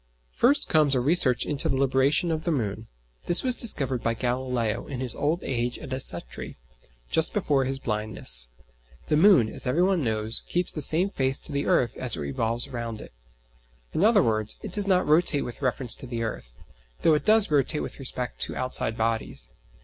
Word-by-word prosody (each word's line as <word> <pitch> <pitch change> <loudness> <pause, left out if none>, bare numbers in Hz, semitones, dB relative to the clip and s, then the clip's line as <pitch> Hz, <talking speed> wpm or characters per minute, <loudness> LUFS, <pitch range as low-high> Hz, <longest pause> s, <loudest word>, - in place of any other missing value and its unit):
First 275 +4 +2
comes 150 -3 +3
a - - +1
research 130 -2 +3
into 145 -2 0
the 135 - -1
libration 140 +5 +2
of 160 0 -3
the 170 - -1
moon. 110 -5 -4 0.4
This 175 - +4
was 255 -1 +4
discovered 135 - +3
by 115 0 -2
Galileo 125 -2 -3
in 135 -3 -6
his 130 -3 -4
old 155 +4 -2
age 120 -1 -3
at 130 - -8
Arcetri, 85 - -2 0.5
just - - +3
before 135 -2 0
his 135 +1 -4
blindness. 105 - +1 0.6
The - - +2
moon, 160 - +5
as 110 - -6
every 155 +8 +1
one 185 -4 0
knows, 110 -1 -2
keeps 175 0 -1
the 155 - -6
same 170 +7 +4
face 135 -4 0
to - - +2
the 140 0 -3
earth 120 -3 0
as 125 -3 0
it - - -6
revolves 115 - -3
round 120 -4 -6
it. - - -12 0.8
In 165 - -1
other 210 -3 +4
words, 110 -1 -1
it - - -7
does 205 -1 -2
not 185 -2 +2
rotate 155 -2 +2
with 120 - -8
reference 130 -2 +3
to 130 - -8
the 120 -1 -4
earth, 105 - -6 0.5
though 160 - +4
it 150 - 0
does 215 -4 +2
rotate 145 +1 0
with - - -8
respect 125 -2 -4
to - - 0
outside 125 -3 -1
bodies. 110 - -3
130 Hz, 195 wpm, -25 LUFS, 115-155 Hz, 0.8 s, moon